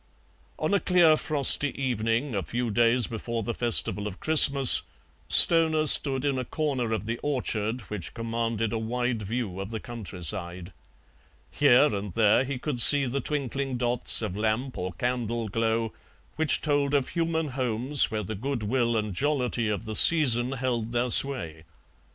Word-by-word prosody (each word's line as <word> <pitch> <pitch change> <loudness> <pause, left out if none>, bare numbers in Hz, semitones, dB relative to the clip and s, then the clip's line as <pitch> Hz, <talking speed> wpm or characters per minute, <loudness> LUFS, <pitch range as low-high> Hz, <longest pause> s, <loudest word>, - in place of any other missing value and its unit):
On - - -3
a 200 - +2
clear 175 -4 +3
frosty 145 -2 +4
evening, 120 +1 -2
a 100 - -2
few 120 +7 -4
days 120 +2 +2
before 115 +1 -6
the 115 - -4
festival 110 -3 +1
of 100 -2 -9
Christmas, 140 -4 +5 0.5
Stoner 160 -2 +5
stood 140 -2 +5
in 135 -2 -1
a - - -3
corner 130 -4 -4
of 110 -1 -4
the 115 +2 -5
orchard 120 -4 -3
which 105 -3 -8
commanded 115 -1 -4
a 115 - -2
wide 120 +1 -3
view 105 -2 -5
of 95 0 -7
the 110 -1 -6
countryside. 90 -5 -4 0.8
Here 145 0 +3
and 100 -2 -6
there 110 +2 +2
he 135 0 -5
could 125 -2 -2
see 140 +5 +5
the 135 +2 -3
twinkling 135 -2 -4
dots 120 0 0
of 90 - -5
lamp 110 +5 -3
or 90 0 -6
candle 120 -2 -4
glow 115 +1 -2 0.4
which 160 -1 +1
told 145 -1 -1
of 140 -2 -1
human 165 -2 -3
homes 130 +1 0
where 110 -1 -4
the 110 - -7
goodwill 120 0 -2
and 105 -2 -4
jollity 125 -2 -2
of 105 +2 -4
the 110 - -6
season 125 -3 +4
held 120 -3 -4
their 120 +1 -1
sway. 85 - +2
120 Hz, 160 wpm, -25 LUFS, 110-140 Hz, 0.8 s, Christmas